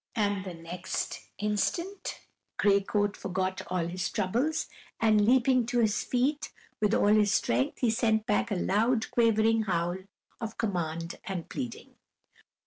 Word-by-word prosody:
And 205 Hz, -3 st, 0 dB
the 180 Hz, -2 st, -6 dB
next 170 Hz, +2 st, -5 dB
instant 340 Hz, -, -2 dB, 0.4 s
Gray 200 Hz, -1 st, +4 dB
Coat 205 Hz, +1 st, 0 dB
forgot 185 Hz, 0 st, -2 dB
all 180 Hz, -2 st, -1 dB
his 180 Hz, +2 st, -2 dB
troubles 240 Hz, +11 st, 0 dB, 0.3 s
and, 215 Hz, -2 st, +4 dB
leaping 255 Hz, -1 st, +4 dB
to 245 Hz, 0 st, -1 dB
his 220 Hz, -3 st, +2 dB
feet, 275 Hz, +4 st, 0 dB, 0.3 s
with 210 Hz, 0 st, +2 dB
all -, -, +3 dB
his 210 Hz, -2 st, +4 dB
strength 125 Hz, -8 st, 0 dB
he 240 Hz, -3 st, +3 dB
sent 220 Hz, -2 st, +1 dB
back 210 Hz, -3 st, +1 dB
a 205 Hz, -, 0 dB
loud 220 Hz, +6 st, +1 dB
quavering 225 Hz, -1 st, +3 dB
howl 175 Hz, -1 st, 0 dB, 0.4 s
of 225 Hz, -2 st, -5 dB
command 170 Hz, -5 st, -2 dB
and 185 Hz, -4 st, -4 dB
pleading. 245 Hz, -3 st, -6 dB
210 Hz, 140 wpm, -29 LUFS, 185-230 Hz, 0.4 s, Gray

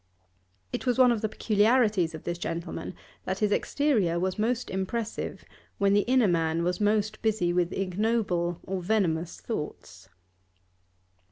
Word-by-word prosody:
It -, -, -3 dB
was 245 Hz, -, +2 dB
one 255 Hz, -2 st, +6 dB
of 230 Hz, -3 st, 0 dB
the 220 Hz, -, -1 dB
peculiarities 210 Hz, -6 st, +2 dB
of 155 Hz, -, -9 dB
this 175 Hz, 0 st, -3 dB
gentleman 170 Hz, +1 st, -4 dB, 0.3 s
that -, -, -2 dB
his 210 Hz, -2 st, +1 dB
exterior 210 Hz, -, +1 dB
was 185 Hz, +2 st, -2 dB
most 235 Hz, +3 st, 0 dB
impressive 210 Hz, +4 st, -3 dB, 0.3 s
when 200 Hz, 0 st, +3 dB
the 205 Hz, -, +5 dB
inner 255 Hz, -4 st, +4 dB
man 165 Hz, -1 st, +1 dB
was 180 Hz, +3 st, -1 dB
most 210 Hz, 0 st, +1 dB
busy 210 Hz, -6 st, +1 dB
with 175 Hz, 0 st, +1 dB
ignoble 185 Hz, -3 st, 0 dB
or 190 Hz, -1 st, -3 dB
venomous 175 Hz, -4 st, 0 dB
thoughts. 95 Hz, -, -6 dB
200 Hz, 145 wpm, -27 LUFS, 175-220 Hz, 0.3 s, one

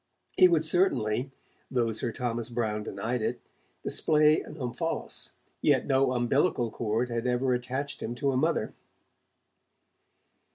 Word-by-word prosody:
He 185 Hz, -, +8 dB
would 165 Hz, -3 st, +2 dB
certainly 135 Hz, -, +1 dB, 0.4 s
though 120 Hz, -3 st, +1 dB
Sir 115 Hz, +2 st, -2 dB
Thomas 120 Hz, 0 st, -3 dB
Browne 110 Hz, -3 st, -1 dB
denied 110 Hz, +4 st, -3 dB
it 115 Hz, +3 st, -2 dB, 0.4 s
display 155 Hz, 0 st, +3 dB
an 150 Hz, -, -10 dB
'omphalos', 125 Hz, -5 st, -2 dB, 0.3 s
yet -, -, +3 dB
no 135 Hz, -1 st, +2 dB
umbilical 120 Hz, 0 st, +1 dB
cord 115 Hz, +2 st, -1 dB
had 115 Hz, +1 st, -1 dB
ever 125 Hz, +1 st, +1 dB
attached 130 Hz, +3 st, -3 dB
him 120 Hz, -, -4 dB
to 140 Hz, +2 st, 0 dB
a -, -, -2 dB
mother. 150 Hz, -4 st, 0 dB
125 Hz, 130 wpm, -28 LUFS, 115-140 Hz, 0.4 s, He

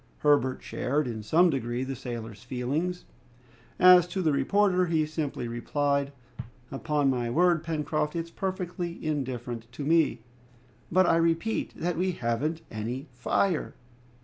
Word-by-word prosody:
Herbert 145 Hz, -3 st, +2 dB
shared 145 Hz, +4 st, -1 dB
in 115 Hz, -3 st, -4 dB
some 165 Hz, -, +4 dB
degree 120 Hz, -2 st, -2 dB
the 135 Hz, +1 st, -4 dB
sailor's 115 Hz, -4 st, -7 dB
feelings. 140 Hz, +9 st, -2 dB, 0.7 s
As 180 Hz, -1 st, +8 dB
to 185 Hz, +1 st, -3 dB
the 155 Hz, -, +3 dB
reporter, 185 Hz, +6 st, +2 dB
he 160 Hz, -2 st, +2 dB
simply 150 Hz, -5 st, -3 dB
replied, 140 Hz, +4 st, -1 dB, 0.6 s
"Upon 145 Hz, +1 st, 0 dB
my 120 Hz, -2 st, -1 dB
word, 170 Hz, +5 st, +3 dB
Pencroft, 155 Hz, -1 st, -1 dB
it's 165 Hz, 0 st, -3 dB
perfectly 180 Hz, -2 st, -4 dB
indifferent 125 Hz, -5 st, -3 dB
to 145 Hz, -, -6 dB
me!" 160 Hz, -7 st, +2 dB, 0.7 s
"But, 185 Hz, +2 st, +5 dB
I 165 Hz, -, +4 dB
repeat, 165 Hz, +6 st, 0 dB
that 175 Hz, -1 st, -2 dB
we 185 Hz, +1 st, 0 dB
haven't 145 Hz, +6 st, -1 dB
any 120 Hz, +6 st, -4 dB
fire!" 155 Hz, +8 st, 0 dB
150 Hz, 135 wpm, -28 LUFS, 125-170 Hz, 0.7 s, As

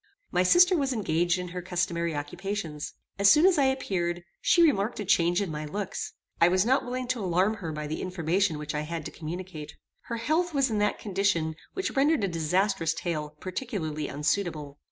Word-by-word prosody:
My 180 Hz, -, +2 dB
sister 355 Hz, -, +6 dB
was 275 Hz, -5 st, 0 dB
engaged 175 Hz, -4 st, +1 dB
in 180 Hz, 0 st, -5 dB
her 180 Hz, +1 st, -5 dB
customary 170 Hz, -2 st, -1 dB
occupations. 160 Hz, +1 st, -4 dB, 0.2 s
As 200 Hz, 0 st, +6 dB
soon 305 Hz, -, +6 dB
as 370 Hz, -5 st, +5 dB
I 275 Hz, -, +4 dB
appeared, 175 Hz, -10 st, -1 dB, 0.2 s
she 345 Hz, -, +5 dB
remarked 230 Hz, -9 st, +2 dB
a 205 Hz, -, -3 dB
change 175 Hz, +1 st, +3 dB
in 185 Hz, -, -4 dB
my 150 Hz, 0 st, -4 dB
looks. 190 Hz, +6 st, -4 dB, 0.3 s
I 170 Hz, -, +8 dB
was 185 Hz, +2 st, +3 dB
not 260 Hz, +3 st, +3 dB
willing 250 Hz, 0 st, -4 dB
to 250 Hz, -5 st, -1 dB
alarm 185 Hz, +4 st, +1 dB
her 165 Hz, -6 st, -5 dB
by 150 Hz, 0 st, -4 dB
the 155 Hz, +1 st, -4 dB
information 180 Hz, -1 st, 0 dB
which 150 Hz, 0 st, -5 dB
I 150 Hz, -, -1 dB
had 160 Hz, 0 st, -5 dB
to -, -, -5 dB
communicate. 165 Hz, -1 st, -7 dB, 0.3 s
Her 235 Hz, -, -4 dB
health 315 Hz, +7 st, 0 dB
was 275 Hz, -3 st, +2 dB
in 215 Hz, -, 0 dB
that 210 Hz, 0 st, +1 dB
condition 195 Hz, -5 st, 0 dB, 0.2 s
which 380 Hz, 0 st, -1 dB
rendered 285 Hz, -2 st, +3 dB
a -, -, +2 dB
disastrous 170 Hz, 0 st, 0 dB
tale 155 Hz, -4 st, -3 dB
particularly 185 Hz, -, -4 dB
unsuitable. 150 Hz, -1 st, -2 dB
185 Hz, 195 wpm, -28 LUFS, 165-220 Hz, 0.3 s, I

